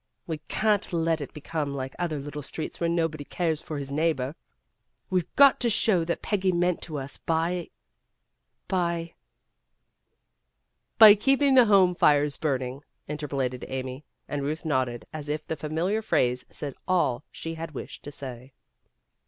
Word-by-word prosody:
We 160 -3 -4
can't 210 -1 +1
let 165 -2 +1
it 140 - -6
become 150 -1 -4
like 130 -1 -4
other 170 -4 -1
little 145 +1 -6
streets 155 +2 -5
where 170 - +1
nobody 165 -3 0
cares 160 0 -1
for 155 - -5
his 140 -1 -5
neighbor. 145 -3 0 0.8
We've 180 -3 0
got 280 -1 +7
to 240 - +2
show 205 -5 +3
what 170 +1 -3
Peggy 195 -3 +1
meant 175 0 +1
to 155 -3 -5
us 135 0 -3
by 165 +2 -1 1.0
by 170 -2 -1 0.9
" - - -52
"By 220 -3 +11
keeping 270 +6 +3
the 255 -2 +7
home 195 -4 +5
fires 145 -4 +3
burning," 130 -3 -2 0.3
inter 150 0 -4
polated 130 -3 -2
Amy, 130 +1 -5 0.2
and 145 - -3
Ruth 155 +4 -3
nodded 130 -6 -1
as 150 -2 -6
if 150 +1 -2
the 160 - -3
familiar 165 +8 -1
phrase 125 - +1
said 145 -3 -6
all 160 -9 +1
she 165 - -6
had 165 -1 -6
wished - - -7
to 145 - -6
say. 130 -2 -8
155 Hz, 160 wpm, -27 LUFS, 140-175 Hz, 1.0 s, By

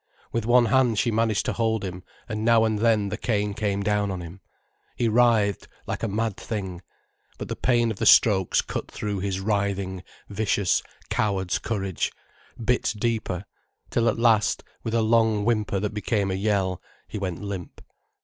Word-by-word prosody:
With 115 -1 -2
one 120 0 +5
hand 120 -1 +3
she 120 - +2
managed 110 -1 +1
to - - 0
hold 110 -3 0
him, 90 -1 -6 0.3
and 110 -2 -3
now 115 0 +5
and 110 -1 0
then 110 -3 +2
the 105 - -3
cane 105 -3 0
came 100 -1 -1
down 105 0 +1
on 95 -2 -3
him. 85 +3 -9 0.5
He 120 - +1
writhed, 110 -3 +3 0.2
like - - -4
a 115 - 0
mad 110 0 -1
thing. 95 -5 -5 0.6
But - - -6
the - - -2
pain 120 -2 +2
of 105 - -6
the - - +1
strokes 95 -5 +5
cut - - -5
through 105 -2 -3
his 95 0 -2
writhing, 100 -2 -1 0.3
vicious, 100 -2 +1 0.3
coward's 95 -4 0
courage, 95 -5 -2 0.5
bit 120 -1 0
deeper, 105 -5 -2 0.5
till 115 0 +2
at - - -1
last, 115 -3 +3 0.2
with 115 0 -3
a 115 - +3
long 110 -2 +3
whimper 105 -4 +1
that 105 +1 -2
became 105 -2 0
a - - 0
yell, 95 -2 0 0.3
he 105 - -5
went 95 -1 -4
limp. 100 -4 -6
105 Hz, 175 wpm, -25 LUFS, 100-115 Hz, 0.6 s, one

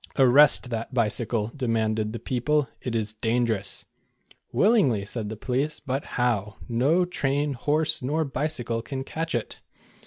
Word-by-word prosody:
"Arrest 135 -1 +6
that 115 +1 -3
bicycle," 115 -1 0
demanded 110 -4 0
the 115 - -4
people; 135 +5 0
"it 120 -2 -3
is 110 -1 -1
dangerous." 110 -2 0 0.7
"Willingly," 175 - +3
said 105 0 -3
the 110 - -6
police, 135 +7 -1
"but 135 0 -3
how? 105 -4 0
No 140 +10 +2
train, 145 -4 -1
horse, 150 +5 +1
nor 155 +5 0
bicycle 130 -5 -2
can 135 +2 -5
catch 160 +1 -3
it." 120 - -4
125 Hz, 135 wpm, -26 LUFS, 115-145 Hz, 0.7 s, Arrest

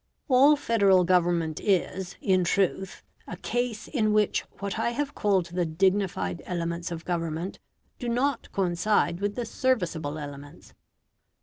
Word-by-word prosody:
All 275 +3 +6
Federal 200 -9 +3
Government 175 -3 +1
is, 190 -1 0
in 185 -2 +2
truth, 190 +1 0 0.2
a - - -6
case 245 -3 -2
in 215 -6 +1
which 210 -1 +2 0.2
what 200 0 -4
I - - +1
have 285 +4 -3
called 195 -7 +1
the 180 0 +1
dignified 170 - 0
elements 170 -1 -3
of 165 -1 -6
government 170 +1 -3 0.4
do 245 - -3
not 250 +2 -1
coincide 175 -1 +1
with 205 0 -1
the 245 - -3
serviceable 180 - -1
elements. 145 -1 -10
190 Hz, 135 wpm, -27 LUFS, 170-220 Hz, 0.4 s, All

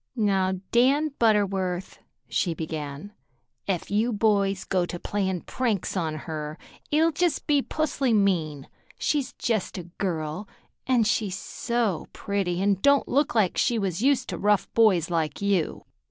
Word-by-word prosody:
"Now, 195 -3 +2 0.2
Dan 275 +6 +4
Butterworth," 195 -5 +1 0.3
she 120 +9 0
began, 155 +3 -6 0.5
"ef 190 -2 -2
you 220 +4 +2
boys 200 -3 +1
go 185 -2 0
to 175 0 -5
playin' 190 -3 -2
pranks 225 -9 -2
on 160 -4 -1
her, 155 -1 -5 0.3
it'll 320 +2 +3
be 295 - -13
just 350 -2 +1 0.2
pusly 285 -4 0
mean. 170 -9 +1 0.3
She's 290 -3 -1
jest 220 -6 -2
a 180 - -5 0.2
girl, 165 0 -2 0.4
an' 250 -3 +4
she's 210 -3 0
so 235 -7 -2
pretty 195 -3 -2
an' 200 -2 +2
don't 280 -1 +4
look 280 -2 +1
like 205 -6 +2
she 240 -2 +2
was 195 -3 -2
used 265 -1 +2
to - - -4
rough 210 0 +2
boys 190 -7 +4
like 160 -3 -1
you." 200 -5 0
200 Hz, 145 wpm, -26 LUFS, 175-230 Hz, 0.5 s, Dan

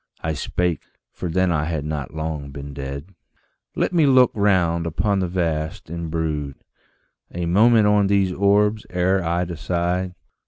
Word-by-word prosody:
I 80 - -1
spake 90 +2 -1 0.3
for 90 - -5
then 95 +2 +1
I 75 -2 0
had 80 -3 -3
not 75 -4 -4
long 80 -2 -4
been 70 +1 -8
dead 70 +6 -7 0.6
"Let - - 0
me 160 -4 +4
look 130 -2 +5
round 90 -5 +2
upon 100 +5 0
the 90 - 0
vasts, 80 -3 -2
and 85 -1 -4
brood 75 -4 -2 0.8
A 85 0 -3
moment 110 +5 +5
on 105 -1 +4
these 100 -2 +2
orbs 105 +2 +2
ere 90 +1 +1
I 85 +2 0
decide 90 +2 -2
85 Hz, 155 wpm, -22 LUFS, 80-100 Hz, 0.8 s, look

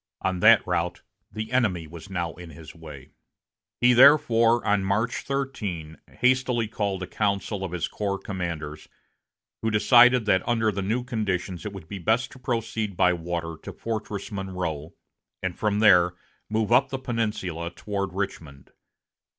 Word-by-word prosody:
On 95 -1 0
that 110 +3 +6
route 90 0 -2 0.3
the 110 +1 -5
enemy 105 -10 +1
was 85 +4 -11
now 85 -4 -3
in 90 -1 -11
his 80 +1 -12
way. 75 -5 -12 0.7
He 125 0 +6
therefore, 120 -3 +5
on 100 -1 +2
March 110 +6 0
13, 105 - -4 0.3
hastily 125 -2 +2
called 100 -3 -2
a - - -2
council 100 +1 -2
of 95 - -4
his 90 -1 -2
corps 100 -2 -3
commanders, 85 -6 -5 0.7
who 110 - 0
decided 120 +3 +5
that 95 -3 +3
under 115 -2 +2
the 100 0 -3
new 110 +6 -1
conditions 95 -6 -3
it 105 - -7
would 95 -5 -10
be 100 +2 -6
best 110 +8 +1
to 130 - -13
proceed 115 -5 -3
by 90 - +4
water 85 -1 -4
to - - -7
Fortress 110 -3 -5
Monroe, 90 -6 -4 0.5
and 95 -2 -2
from 105 -1 0
there 90 -5 +5 0.3
move 110 0 -1
up 130 +3 +4
the 135 - -3
Peninsula 105 -9 -3
toward 100 +1 -4
Richmond. 80 -8 -6
100 Hz, 155 wpm, -25 LUFS, 90-115 Hz, 0.7 s, that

